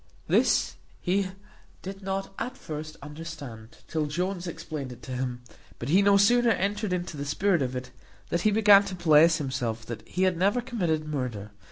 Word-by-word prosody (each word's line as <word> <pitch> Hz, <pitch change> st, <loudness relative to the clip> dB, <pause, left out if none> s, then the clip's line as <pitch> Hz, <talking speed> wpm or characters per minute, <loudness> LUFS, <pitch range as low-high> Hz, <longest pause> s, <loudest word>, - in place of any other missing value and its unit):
This -, -, +2 dB, 0.2 s
he 190 Hz, +1 st, +1 dB, 0.6 s
did 195 Hz, +1 st, -7 dB
not 195 Hz, 0 st, -3 dB
at 255 Hz, +2 st, -4 dB
first 155 Hz, +1 st, -7 dB
understand, 145 Hz, -7 st, -9 dB
till 155 Hz, -2 st, -1 dB
Jones 180 Hz, +4 st, -2 dB
explained 150 Hz, -5 st, -5 dB
it 125 Hz, 0 st, -12 dB
to 130 Hz, -, -8 dB
him; 125 Hz, -1 st, -3 dB, 0.3 s
but -, -, -5 dB
he 185 Hz, +6 st, +5 dB
no 200 Hz, 0 st, +5 dB
sooner 240 Hz, +4 st, +5 dB
entered 205 Hz, -1 st, 0 dB
into 175 Hz, -3 st, -3 dB
the 140 Hz, -, -3 dB
spirit 175 Hz, +4 st, +1 dB
of 130 Hz, -1 st, -2 dB
it, 125 Hz, 0 st, -5 dB, 0.4 s
than 170 Hz, -, +1 dB
he 215 Hz, -, +3 dB
began 205 Hz, -1 st, +7 dB
to 195 Hz, -2 st, -5 dB
bless 165 Hz, -1 st, +5 dB
himself 125 Hz, -6 st, -3 dB
that 115 Hz, -1 st, -6 dB
he 185 Hz, -, -1 dB
had 185 Hz, -2 st, +2 dB
never 200 Hz, +7 st, +2 dB
committed 175 Hz, -11 st, -1 dB
murder. 125 Hz, -8 st, -4 dB
165 Hz, 180 wpm, -27 LUFS, 140-195 Hz, 0.6 s, began